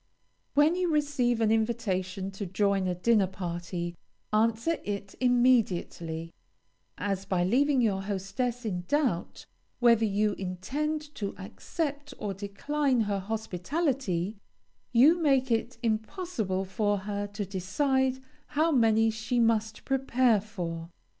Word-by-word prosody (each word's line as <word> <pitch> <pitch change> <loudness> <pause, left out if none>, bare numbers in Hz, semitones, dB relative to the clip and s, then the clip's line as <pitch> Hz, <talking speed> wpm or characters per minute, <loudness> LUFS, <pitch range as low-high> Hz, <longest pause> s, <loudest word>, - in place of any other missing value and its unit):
When 295 +4 +5
you 360 -2 0
receive 270 -6 +1
an 220 -1 +3
invitation 200 -4 -1
to 195 0 -5
join 195 0 +1
a 180 - 0
dinner 205 +1 +3
party, 175 -1 -4 0.4
answer 230 +9 +2
it 200 -1 -4
immediately, 200 -10 +1 0.6
as, 195 -1 -2
by 180 -2 +1
leaving 265 +7 +3
your 200 -4 +1
hostess 210 +5 -3
in 180 -5 -2
doubt 270 - 0 0.3
whether 235 -2 +5
you 210 0 +2
intend 295 - -3
to 200 -2 -4
accept 285 - -4
or 205 -2 -3
decline 245 +7 0
her 205 -2 0
hospitality, 220 - -2 0.5
you 290 +9 +6
make 270 -4 +3
it 230 +2 0
impossible 220 - -1
for 205 +1 0
her 205 0 -3
to 205 0 -4
decide 260 +8 0 0.3
how 325 +2 +4
many 225 -4 +4
she 220 +3 -1
must 220 -1 +1
prepare 255 -5 +2
for. 170 -5 -5
220 Hz, 120 wpm, -29 LUFS, 195-255 Hz, 0.6 s, you